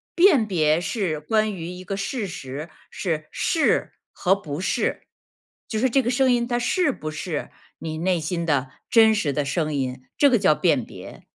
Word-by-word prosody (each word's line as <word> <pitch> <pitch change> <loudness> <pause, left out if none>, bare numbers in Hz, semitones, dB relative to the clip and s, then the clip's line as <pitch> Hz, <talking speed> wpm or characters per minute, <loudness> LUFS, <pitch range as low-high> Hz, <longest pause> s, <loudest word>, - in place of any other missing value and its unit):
辨 340 - +5
别 160 -5 +2
是 175 -5 -2
关 215 +6 +1
于 165 -2 -6
一 180 +1 -8
个 195 - -3
事 205 +2 -3
实， 145 -1 -7 0.2
是 160 -5 -3
是 325 -2 +1 0.2
和 190 +1 +2
不 150 -7 -6
是。 185 - -1 0.7
就 220 - -1
是 260 +3 +2
这 270 +3 +3
个 245 - -1
声 260 +1 +3
音 240 -1 +2
它 240 -1 0
是 340 +5 +1
不 155 -11 -6
是 155 0 -4 0.3
你 160 -1 -5
内 180 +1 +1
心 170 +2 -2
的 140 -4 0 0.2
真 220 -1 +6
实 165 -9 0
的 145 +1 -1
声 155 +1 -1
音， 130 -2 -3
这 285 - +6
个 250 - +4
叫 175 - +4
辨 - - +2
别。 - - -11
180 Hz, 200 characters per minute, -23 LUFS, 155-230 Hz, 0.7 s, 真